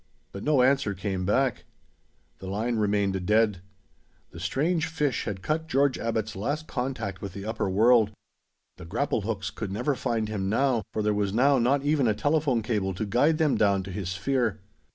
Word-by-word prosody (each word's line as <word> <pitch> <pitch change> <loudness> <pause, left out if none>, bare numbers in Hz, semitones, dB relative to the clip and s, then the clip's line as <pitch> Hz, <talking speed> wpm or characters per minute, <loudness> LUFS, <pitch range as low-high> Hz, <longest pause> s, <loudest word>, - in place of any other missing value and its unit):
But 100 - -7
no 145 -4 +3
answer 130 -6 +2
came 95 -1 -3
back. 130 +3 +1 0.8
The 95 - -8
line 110 +5 -1
remained 100 -3 0
dead. 105 -3 +3 0.7
The 85 - -10
strange 155 - 0
fish 150 -5 -1
had 95 -4 -5
cut 160 - -1
George 140 -2 +2
Abbot's 110 -1 -2
last 145 +10 -2
contact 125 -7 -4
with 100 -3 -6
the 100 0 -7
upper 110 -3 -2
world. 110 +2 +4 0.7
The - - -10
grapple 115 +7 -1
hooks 100 -3 -3
could 110 -4 -5
never 125 +8 0
find 115 -4 -1
him 100 -3 -2
now, 125 +1 +2
for 110 - -2
there 105 0 +2
was 100 -1 -1
now 135 +2 +4
not 135 +4 +2
even 145 -3 +2
a 110 - +2
telephone 145 -4 +1
cable 100 -5 -1
to 110 - -2
guide 135 +10 +2
them 155 -3 +2
down 100 -2 +2
to 95 - -8
his 95 -2 -4
sphere. 110 +2 -1
110 Hz, 185 wpm, -27 LUFS, 100-135 Hz, 0.8 s, world